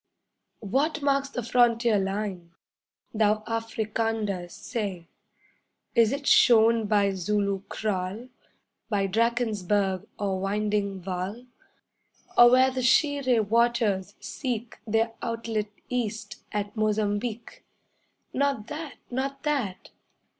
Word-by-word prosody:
What 285 Hz, +8 st, 0 dB
marks 275 Hz, -1 st, +1 dB
the 245 Hz, -3 st, -4 dB
frontier 235 Hz, -2 st, +3 dB
line? 195 Hz, -3 st, -3 dB, 0.6 s
Thou 215 Hz, -1 st, +2 dB
Africander, 225 Hz, -4 st, -2 dB
say! 190 Hz, -6 st, -5 dB, 0.8 s
Is 230 Hz, -3 st, +4 dB
it 280 Hz, +1 st, -3 dB
shown 230 Hz, -3 st, +5 dB
by 205 Hz, -1 st, +3 dB
Zulu 200 Hz, +1 st, -1 dB
kraal, 210 Hz, +3 st, -3 dB, 0.6 s
By 200 Hz, -3 st, +1 dB
Drakensberg 205 Hz, -3 st, 0 dB
or 195 Hz, -2 st, -1 dB
winding 200 Hz, 0 st, -1 dB
Vaal, 190 Hz, +6 st, -4 dB, 0.9 s
Or 240 Hz, 0 st, +9 dB
where 260 Hz, +1 st, +5 dB
the 260 Hz, 0 st, -2 dB
Shiré 255 Hz, -4 st, +3 dB
waters 225 Hz, -4 st, +1 dB
seek 240 Hz, -4 st, -5 dB
Their 225 Hz, +1 st, +1 dB
outlet 225 Hz, -2 st, -2 dB, 0.2 s
east 220 Hz, -4 st, -3 dB
at 205 Hz, 0 st, -3 dB
Mozambique? 215 Hz, +1 st, -2 dB, 0.7 s
'Not 275 Hz, -5 st, 0 dB
that! 300 Hz, -1 st, -6 dB, 0.2 s
Not 275 Hz, +2 st, -3 dB
that! 270 Hz, -11 st, -2 dB
220 Hz, 100 wpm, -26 LUFS, 205-240 Hz, 0.9 s, Or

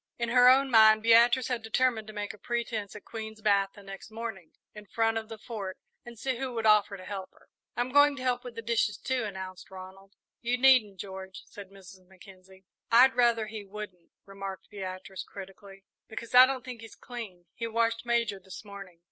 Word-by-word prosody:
In 235 Hz, -1 st, -2 dB
her 250 Hz, +1 st, +7 dB
own 270 Hz, +1 st, +4 dB
mind 220 Hz, -1 st, +6 dB
Beatrice 235 Hz, +2 st, +5 dB
had 245 Hz, -2 st, -2 dB
determined 225 Hz, 0 st, 0 dB
to -, -, -8 dB
make 205 Hz, -1 st, -5 dB
a 210 Hz, -, -16 dB
pretence 230 Hz, -4 st, -3 dB
at 210 Hz, -, -11 dB
Queen's 220 Hz, -1 st, -7 dB
bath 200 Hz, -2 st, +2 dB
the 205 Hz, -, -13 dB
next 195 Hz, +1 st, -10 dB
morning, 220 Hz, -6 st, -7 dB, 0.2 s
in 210 Hz, -1 st, -12 dB
front 225 Hz, +2 st, 0 dB
of 220 Hz, 0 st, -11 dB
the 225 Hz, -, -7 dB
Fort, 205 Hz, -4 st, -6 dB, 0.3 s
and 240 Hz, -1 st, -11 dB
see 260 Hz, +2 st, -2 dB
who 255 Hz, -1 st, -4 dB
would 225 Hz, -1 st, -2 dB
offer 210 Hz, -2 st, +4 dB
to 185 Hz, -, -12 dB
help 195 Hz, -2 st, -6 dB
her. -, -, -25 dB, 0.3 s
"I'm 245 Hz, +1 st, -1 dB
going 285 Hz, +1 st, +5 dB
to 255 Hz, -, -7 dB
help 245 Hz, -1 st, 0 dB
with 245 Hz, -2 st, -9 dB
the 230 Hz, -, -6 dB
dishes, 225 Hz, -2 st, 0 dB
too," 260 Hz, -2 st, -2 dB
announced 190 Hz, -2 st, -8 dB
Ronald. 190 Hz, +1 st, -12 dB, 0.3 s
"You 245 Hz, +1 st, 0 dB
needn't, 245 Hz, -7 st, +4 dB
George," 190 Hz, -1 st, -8 dB
said 205 Hz, -3 st, -12 dB
Mrs. 190 Hz, -1 st, -15 dB
Mackenzie. 190 Hz, 0 st, -17 dB, 0.3 s
"I'd 255 Hz, +3 st, +7 dB
rather 235 Hz, -2 st, +3 dB
he 215 Hz, -1 st, -7 dB
wouldn't," 195 Hz, -3 st, -10 dB, 0.2 s
remarked 195 Hz, -2 st, -8 dB
Beatrice, 190 Hz, -1 st, -7 dB
critically, 195 Hz, 0 st, -12 dB, 0.2 s
"because 230 Hz, +2 st, -8 dB
I 250 Hz, +1 st, +9 dB
don't 260 Hz, -2 st, -4 dB
think 250 Hz, -3 st, -8 dB
he's 225 Hz, -2 st, -12 dB
clean. 215 Hz, -8 st, -9 dB
He 230 Hz, -, -4 dB
washed 230 Hz, 0 st, 0 dB
Major 235 Hz, -4 st, 0 dB
this 190 Hz, +3 st, -11 dB
morning." 195 Hz, -4 st, -11 dB
215 Hz, 200 wpm, -29 LUFS, 195-235 Hz, 0.3 s, I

